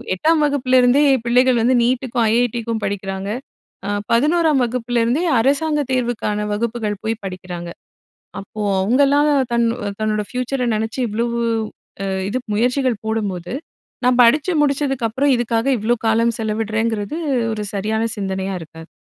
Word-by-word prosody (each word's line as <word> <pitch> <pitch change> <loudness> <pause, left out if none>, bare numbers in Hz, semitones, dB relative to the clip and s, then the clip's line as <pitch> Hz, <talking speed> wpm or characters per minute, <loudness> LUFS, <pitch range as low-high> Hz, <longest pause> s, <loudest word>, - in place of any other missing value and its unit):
8ஆம் 315 - +2
வகுப்பிலேருந்தே 260 -1 +3 0.2
பிள்ளைகள் 250 +1 +3
வந்து 250 +3 +3
நீட்டுக்கும், 245 0 0
ஐஐடிக்கும் 235 -1 0
படிக்கிறாங்க.அ 200 +4 -4 0.6
11ஆம் 305 +3 +3
வகுப்புலேருந்தே 240 +4 0 0.2
அரசாங்கத் 285 +2 +1
தேர்வுக்கான 235 -4 -1
வகுப்புகள் 215 -2 -2
போய் 225 0 -2
படிக்கிறாங்க. 180 -2 -6 0.7
அப்போ 200 +2 -10 0.2
அவங்கலாம் 280 +8 +3 0.2
தன் 235 0 +2 0.3
தன்னோட 215 -1 0
ஃப்யூச்சரை 250 0 -2
நினச்சு 220 +3 -3
இவ்ளோ 225 +3 -1 0.8
அ - - -2 0.2
இது 240 +5 -1 0.2
முயற்சிகள் 245 0 0
போடும்போது, 200 -5 -3 0.5
நான் 250 0 +3
படிச்சு 295 +9 +4
முடிச்சதுக்கு 275 -4 0
அப்புறம் 270 +5 +1
இதுக்காக 230 -1 -1
இவ்ளோ 235 +3 +1
காலம் 230 +1 +2
செலவிடுறேங்கிறது, 220 +3 -2 0.4
ஒரு 210 -1 -4
சரியான 215 +3 -1
சிந்தனையா 190 -1 -3
இருக்காது. 160 +1 -12
235 Hz, 115 wpm, -19 LUFS, 215-255 Hz, 0.8 s, படிச்சு